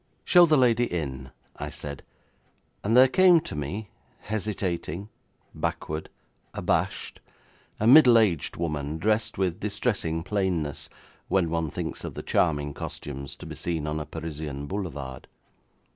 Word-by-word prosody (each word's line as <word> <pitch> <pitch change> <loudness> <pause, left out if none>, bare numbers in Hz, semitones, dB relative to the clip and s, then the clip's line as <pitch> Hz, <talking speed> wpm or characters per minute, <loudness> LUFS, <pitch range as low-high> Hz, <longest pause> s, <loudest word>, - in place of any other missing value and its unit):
'Show 175 -1 +7
the 155 -1 +4
lady 120 -2 +4
in,' 70 -6 -4 0.3
I - - -4
said, 70 -2 -7 0.8
and 115 +4 +3
there 130 +1 +9
came 180 +4 +6
to - - -6
me, 95 +9 -4 0.3
hesitating, 100 -3 -3 0.4
backward, 75 +1 -3 0.5
abashed, - - -1 0.6
a 110 - 0
middle 125 -1 +8
aged 100 -9 +1
woman, 75 -2 -2
dressed 110 +4 0
with 95 -2 0
distressing 100 -6 -1
plainness, 90 -7 -1 0.4
when 90 -4 +1
one 80 -2 0
thinks - - -5
of - - -6
the - - -6
charming 75 -4 +1
costumes 70 -1 -6
to - - -11
be - - -7
seen 80 -3 -2
on 75 0 -2
a 75 - -6
Parisian 75 -3 -5
boulevard. 70 -8 -5
85 Hz, 135 wpm, -26 LUFS, 75-110 Hz, 0.8 s, there